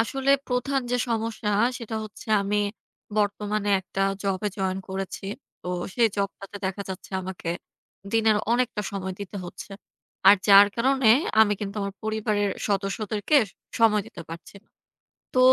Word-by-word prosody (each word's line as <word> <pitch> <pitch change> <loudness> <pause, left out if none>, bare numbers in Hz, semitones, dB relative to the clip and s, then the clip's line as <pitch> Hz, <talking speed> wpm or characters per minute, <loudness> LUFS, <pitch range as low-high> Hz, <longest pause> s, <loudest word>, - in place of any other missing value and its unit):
আসলে 270 +4 0 0.2
প্রধান 265 +2 0
যে, 245 - +2
সমস্যা, 225 -1 -1 0.3
সেটা 225 -1 -5
হচ্ছে 215 - -12 0.2
আমি 205 +1 0 0.6
বর্তমানে 205 0 0
একটা 190 +1 -6 0.2
জবে 195 +1 0
জয়েন 190 0 0
করেছি। 190 0 -5 0.4
তো 180 - -6 0.3
সেই 235 -2 +4
জবটাতে 200 0 -4
দেখা 195 +1 -3
যাচ্ছে, 190 +1 -7
আমাকে 185 -2 -6 0.6
দিনের 220 -1 +4 0.2
অনেকটা 240 -4 +1
সময় 190 -1 -4
দিতে 200 0 -6
হচ্ছে। 175 - -9 0.6
আর 200 - +10
যার 200 0 +10
কারণে 260 0 +3 0.3
আমি 210 -1 +6
কিন্তু 200 +1 -4
আমার 200 0 -4
পরিবারের 215 -2 0 0.2
সদস্যদেরকে 205 +6 0 0.4
সময় 215 -3 +4
দিতে 225 -7 -9
পারছি 165 +4 -9
না। - - -38 0.7
তো 255 - +2
210 Hz, 140 wpm, -25 LUFS, 195-225 Hz, 0.7 s, আর